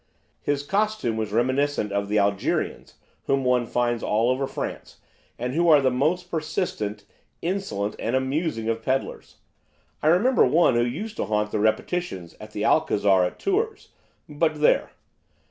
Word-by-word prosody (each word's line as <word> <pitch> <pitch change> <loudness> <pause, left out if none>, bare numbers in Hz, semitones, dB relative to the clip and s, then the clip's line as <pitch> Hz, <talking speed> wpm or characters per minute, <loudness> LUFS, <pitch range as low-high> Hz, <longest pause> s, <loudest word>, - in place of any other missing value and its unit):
His 145 -1 -1
costume 205 - 0
was 110 -2 -3
reminiscent 130 0 +1
of 100 0 -1
the 105 - +1
'Algerians' 100 -1 -1 0.3
whom 135 0 +1
one 125 -2 +2
finds 120 -1 0
all 115 +4 +1
over 135 +1 -1
France, - - -6 0.4
and 125 +2 -3
who 170 +3 +2
are 150 -2 +8
the 130 -2 +2
most 170 +8 0
persistent, 110 - -3 0.4
insolent 135 - -2
and 115 +3 -1
amusing 130 -3 -1
of 115 0 -1
pedlars. 130 +4 -3 0.7
I - - 0
remember 210 +11 +4
one 165 -4 +4
who 120 0 +3
used 190 - -4
to - - -1
haunt 105 0 -1
the 110 - -1
répétitions 110 - -1
at - - -10
the - - -3
Alcazar 100 -3 +3
at 90 - -2
Tours, 430 +3 -1 0.4
but 155 +1 0
there! 150 - +3
130 Hz, 155 wpm, -24 LUFS, 110-165 Hz, 0.7 s, are